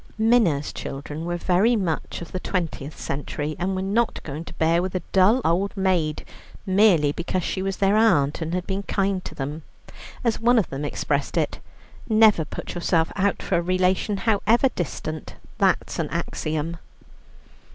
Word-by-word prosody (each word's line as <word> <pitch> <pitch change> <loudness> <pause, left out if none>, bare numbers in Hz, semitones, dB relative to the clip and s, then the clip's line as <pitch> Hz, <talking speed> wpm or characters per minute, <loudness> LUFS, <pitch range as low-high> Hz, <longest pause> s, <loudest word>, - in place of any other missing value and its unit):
Minna's 220 -11 +2
children 145 +3 -6
were 175 0 -2
very 190 +7 +3
much 170 -4 -2
of 170 - -12
the 185 - -3
twentieth 165 -6 -3
century, 145 +2 -4
and 190 +2 -1
were 185 - -2
not 220 +4 0
going 150 +2 -6
to - - -10
bear 165 +1 +2
with 185 +1 -4
a 180 - -1
dull 200 +7 +4
old 190 +5 +1
maid, 180 -6 0 0.4
merely 185 -7 +4
because 170 +3 -2
she 190 - -2
was 195 0 -2
their 195 +1 +3
aunt 165 -10 +3
and 165 +2 -2
had 180 -1 -2
been 195 0 -2
kind 195 -2 -1
to - - -8
them. 145 +3 -4 0.6
As 230 -2 +1
one 240 +2 +4
of 210 - +1
them 135 +2 -4
expressed 145 -1 -2
it, - - 0 0.5
"Never 215 -6 +5
put - - -7
yourself 170 -2 +1
out 200 0 0
for - - +1
a - - +1
relation, 185 +3 +1
however 225 +5 +3
distant. 155 - -5 0.2
That's - - +1
an - - -1
axiom." 155 +2 -3
180 Hz, 170 wpm, -24 LUFS, 160-200 Hz, 0.6 s, Never